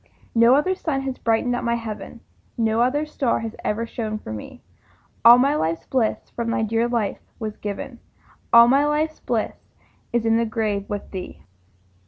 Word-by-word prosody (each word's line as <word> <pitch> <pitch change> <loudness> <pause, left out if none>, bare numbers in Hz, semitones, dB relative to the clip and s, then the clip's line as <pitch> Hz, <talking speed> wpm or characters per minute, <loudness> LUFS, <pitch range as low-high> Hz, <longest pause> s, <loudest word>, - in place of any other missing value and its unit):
No 230 +2 +6
other 300 +7 +2
sun 310 -7 -2
has 265 -1 -4
brightened 230 +2 +1
up - - -3
my 235 0 +1
heaven, 230 0 -7 0.4
No 225 0 +1
other 285 +5 +1
star 280 -5 -1
has 225 0 -5
ever 225 +2 -1
shone 220 -2 -4
for 110 - -8
me; 105 - -9 0.6
All 235 +2 +10
my 275 +3 +3
life's 165 - -1
bliss 245 -5 -1
from 235 -1 -3
thy 230 -1 0
dear 225 +2 +1
life 235 -4 -1 0.2
was 215 -1 -5
given, 215 +4 -6 0.5
All 235 0 +9
my 275 +3 +4
life's 305 +1 0
bliss 230 -3 -1 0.6
is 235 -1 0
in 225 0 +3
the 230 - +1
grave 215 -3 -2
with 205 -1 -5
thee. 185 -2 -7
230 Hz, 180 wpm, -23 LUFS, 220-255 Hz, 0.6 s, All